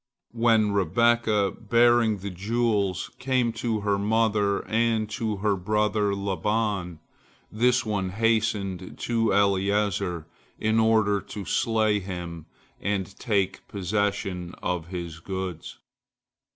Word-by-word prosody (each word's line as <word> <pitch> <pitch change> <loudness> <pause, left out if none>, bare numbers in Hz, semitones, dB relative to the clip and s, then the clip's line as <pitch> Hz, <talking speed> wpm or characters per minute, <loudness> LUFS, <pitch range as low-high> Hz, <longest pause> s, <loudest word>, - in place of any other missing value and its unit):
When 115 -3 +3
Rebekah, 105 +2 +2 0.2
bearing 120 -2 +4
the 100 +1 -6
jewels, 100 -1 -1
came 125 -3 +1
to 110 -3 -1
her 100 -1 0
mother 105 -1 +1
and 115 -1 +1
to 110 -1 -2
her 100 +1 +1
brother 105 +1 0
Laban, 100 -2 -1 0.5
this 125 +3 +2
one 100 -3 -1
hastened 105 -3 -1
to 115 -2 0
Eliezer 100 -3 +1 0.3
in 110 +1 +1
order 110 -3 +3
to 100 0 -8
slay 110 -2 +1
him 90 -4 -7 0.3
and 100 -1 -2
take 100 -5 -1
possession 95 -2 -2
of 90 -3 -2
his 85 -3 -6
goods. 95 -2 -5
105 Hz, 110 wpm, -26 LUFS, 95-110 Hz, 0.5 s, bearing